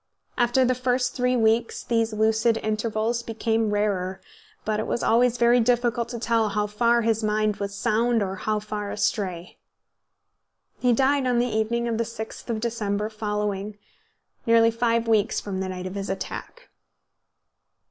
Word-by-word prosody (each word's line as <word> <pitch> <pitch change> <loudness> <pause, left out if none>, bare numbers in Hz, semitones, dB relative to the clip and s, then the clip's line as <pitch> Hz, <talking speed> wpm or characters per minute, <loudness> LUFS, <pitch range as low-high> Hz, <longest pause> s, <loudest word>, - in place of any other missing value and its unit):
After 245 +1 +3
the 255 - +2
first 250 0 0
three 250 0 +1
weeks 225 0 +1
these 230 -1 0
lucid 220 +1 +2
intervals 220 +2 -1
became 225 -1 -1
rarer, 195 -3 -1 0.5
but 215 -1 0
it 220 - -3
was - - -2
always 240 +1 +3
very 240 +1 +4
difficult 240 0 +1
to 240 - -5
tell 230 -2 +1
how 210 +1 0
far 235 +3 +2
his 225 0 +1
mind 215 -1 +1
was 200 0 -4
sound 230 +1 +1
or 190 0 -4
how 215 +2 -1
far 210 -1 -4
astray. 185 -5 -2 1.2
He 250 - +3
died 270 +2 +2
on 245 -1 +2
the 240 - +3
evening 235 +2 0
of 230 -1 -1
the - - +2
6th 220 +1 -8
of 225 -2 -1
December 215 -3 -2
following, 210 -1 -3 0.7
nearly 230 0 +5
five 230 0 0
weeks 220 -2 +2
from 195 -2 -5
the 190 0 -3
night 185 0 -5
of 185 - -5
his 200 0 -4
attack. - - -6
225 Hz, 160 wpm, -25 LUFS, 210-235 Hz, 1.2 s, nearly